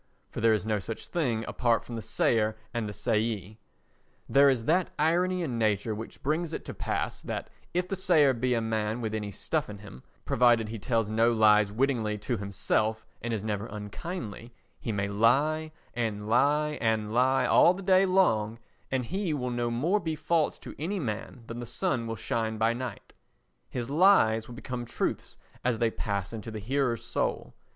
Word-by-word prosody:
for - - -5
there 115 0 +5
is 105 - -3
no 110 -1 0
such 110 +4 -6
thing 120 -10 -1
apart 120 -2 +1
from 120 - -7
the 115 - -4
sayer 110 -1 +1 0.2
and 115 -3 -2
the - - -4
sayee. 110 -2 -1 0.7
There 140 +1 +6
is 120 -4 0
that 175 +5 +2
irony 180 +3 +2
in 125 -7 -2
nature 110 0 +1
which 110 +2 -8
brings 160 +3 -1
it - - -5
to - - -6
pass - - -3
that - - -5 0.2
if 180 +1 0
the 195 - -2
sayer 155 -7 +4
be 125 +1 0
a 115 - +1
man 110 0 -1
with 110 -2 -3
any 105 -1 -3
stuff 150 - -2
in 105 - -7
him, 100 -11 -12 0.2
provided 120 -2 +4
he 115 0 -5
tells 115 -1 0
no 115 +2 +4
lies 105 -2 +5
wittingly 115 -3 0
to 120 +4 -2
himself 105 +2 -1 0.2
and 120 - -3
is 110 -3 -2
never 105 -1 -2
unkindly, 110 - -6 0.3
he 115 - -3
may 100 -2 -1
lie 140 +10 +2 0.2
and 110 -3 -2
lie 145 +5 +2
and 110 -1 0
lie 130 +2 +3
all 175 - +6
the 195 - -7
day 185 +1 +5
long, 115 - +2 0.3
and 130 -2 -1
he 185 - -1
will 125 -3 -2
no 120 0 -1
more 155 - +1
be 160 -4 -3
false 155 +1 +1
to - - -10
any 180 +7 -2
man 115 - -5
than 115 +1 -7
the 120 - -5
sun 115 0 -1
will 115 - -3
shine 110 +2 -2
by 110 +1 +2
night; 120 -2 -6 0.6
his 125 +1 -4
lies 145 - +5
will 120 - -9
become 125 -1 -5
truths 120 - -3 0.3
as 120 -2 +1
they 115 0 +1
pass 100 -3 -3
into 115 0 -6
the 110 - -6
hearer's 120 +2 -1
soul. - - -2
115 Hz, 190 wpm, -28 LUFS, 110-145 Hz, 0.7 s, There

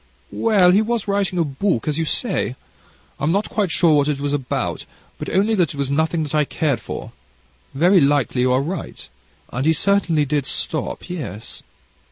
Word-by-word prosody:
"Well, 200 -6 +4
he 200 +4 +4
was 225 -1 -2
writing 200 -2 0
a 170 - +3
book, 145 - -1
as 150 +1 0
you 165 - 0
say; 155 - -1 0.6
I'm 150 +3 +1
not 200 +4 0
quite 205 -4 0
sure 165 0 +3
what 145 0 +2
it 145 -2 -1
was 145 0 -2
about, 135 -3 -2 0.3
but - - -5
only 205 +4 +2
that 175 -9 +1
it - - -11
was 140 -1 -1
nothing 160 +2 +1
that 150 - -6
I 150 -1 +3
cared 145 -2 -1
for; - - -7 0.6
very 175 +5 +5
likely 140 -3 +2
you 125 0 +2
are 130 +2 +2
right, 170 +4 -6 0.5
and 130 - -1
he 160 +2 +4
certainly 170 -3 +2
did 145 -1 -1
stop 155 - -3
yes." 135 - -7
160 Hz, 190 wpm, -21 LUFS, 140-190 Hz, 0.6 s, very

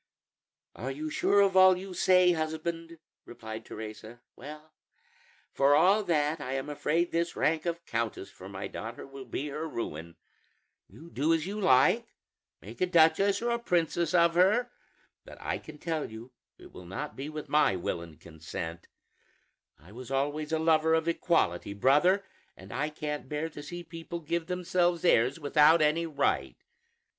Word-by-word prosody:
"Are 125 +5 -5
you 150 +3 -5
sure 200 +5 +3
of 195 -1 +2
all 185 -1 +7
you 190 0 -8
say, 180 0 +4
husband?" 165 +1 -4 0.3
replied 110 -2 -8
Teresa. 110 +2 -9
"Well, 155 +1 -11 0.8
for 140 +1 +4
all 195 +7 +4
that, 155 -2 0
I 130 -1 -4
am 135 +2 -3
afraid 165 +4 0
this 170 +1 -1
rank 160 +2 0
of 170 0 -3
countess 115 -6 -3
for 95 - -12
my 95 0 -6
daughter 115 +1 -7
will 135 -1 -10
be 140 +5 -4
her 155 +3 -5
ruin. 85 - -6 0.7
You 170 +2 -15
do 155 +5 +2
as 160 -1 -3
you 205 +3 -4
like, 130 -7 +3 0.5
make 110 +4 -11
a 185 - +3
duchess 180 +5 +3
or 240 - 0
a 235 - 0
princess 170 -5 0
of 170 -1 +4
her, 210 +8 +3 0.5
but - - -13
I - - -3
can - - -12
tell 160 -1 -3
you 110 +3 -11 0.3
it - - -15
will 90 - -12
not 120 +11 -6
be 140 +3 -6
with 155 -1 -7
my 150 -9 +3
will 85 -1 -3
and 85 -2 -12
consent. 80 +1 -8 0.9
I 80 +8 -18
was 125 +3 -10
always 145 +3 -2
a 160 - +2
lover 160 0 +3
of 160 0 -1
equality, 165 - 0
brother, 165 - +3 0.3
and 95 +2 -11
I 145 +4 -1
can't 150 -3 -5
bear 150 +2 -3
to 150 - -10
see 175 +4 -7
people 165 +1 -7
give 165 +1 -3
themselves 175 -1 0
airs 130 -1 +3
without 150 +2 +5
any 160 +2 +2
right. 155 - -1
155 Hz, 170 wpm, -29 LUFS, 130-170 Hz, 0.9 s, all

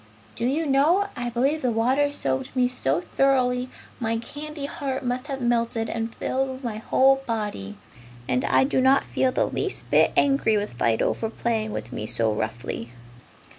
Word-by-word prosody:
Do 235 - -1
you 305 +5 0
know, 310 +9 +3
I 245 0 -3
believe 270 +6 +1
the 255 - +1
water 260 +6 +2
soaked 130 - -2
me 250 -1 +3
so 170 - -1
thoroughly 255 +1 +1 0.3
my 225 -1 0
candy 290 +5 -6
heart 270 -2 -4
must 250 +3 -2
have 270 -2 -4
melted 235 -1 0
and 225 0 -3
filled 265 +2 -2
my 225 -3 -3
whole 270 +4 +3
body, 205 - -3 0.5
and 125 +1 +1
I - - +4
do 265 -1 +1
not 265 +1 +5
feel 260 - +1
the - - +1
least - - -3
bit - - +5
angry 275 -6 +3
with 205 -7 -3
Fido 115 -2 +1
for 225 - -3
playing 225 -1 -2
with 120 - -6
me 105 - -4
so 115 -2 +1
roughly!" 115 +1 -4
245 Hz, 170 wpm, -25 LUFS, 215-270 Hz, 0.5 s, not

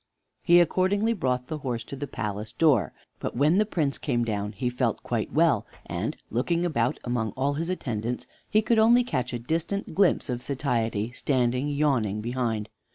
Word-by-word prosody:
He 175 0 +6
accordingly 195 +6 +2
brought 125 - -1
the 155 +3 -5
horse 120 -5 -3
to 140 - -8
the 145 +1 -5
palace 105 -2 -4
door. 130 - +3 0.3
But - - -4
when 155 +8 +4
the 215 - +2
Prince 150 -9 -1
came 120 -4 0
down 105 -1 -2
he 125 +5 -2
felt 125 -2 -1
quite - - -2
well, - - +3 0.2
and, - - -3
looking 170 +9 +1
about 125 -8 0
among 115 -4 -1
all 140 +2 +1
his 165 +4 -3
attendants, 120 -9 -3 0.2
he 215 +1 +3
could 225 0 +3
only 235 +3 +6
catch 125 - -2
a 120 - -2
distant 165 - -2
glimpse 195 +1 +3
of 125 -2 -3
Satiety 120 -6 -1
standing 125 0 0
yawning 135 -8 +1
behind. 115 -2 -2
130 Hz, 175 wpm, -26 LUFS, 115-165 Hz, 0.3 s, He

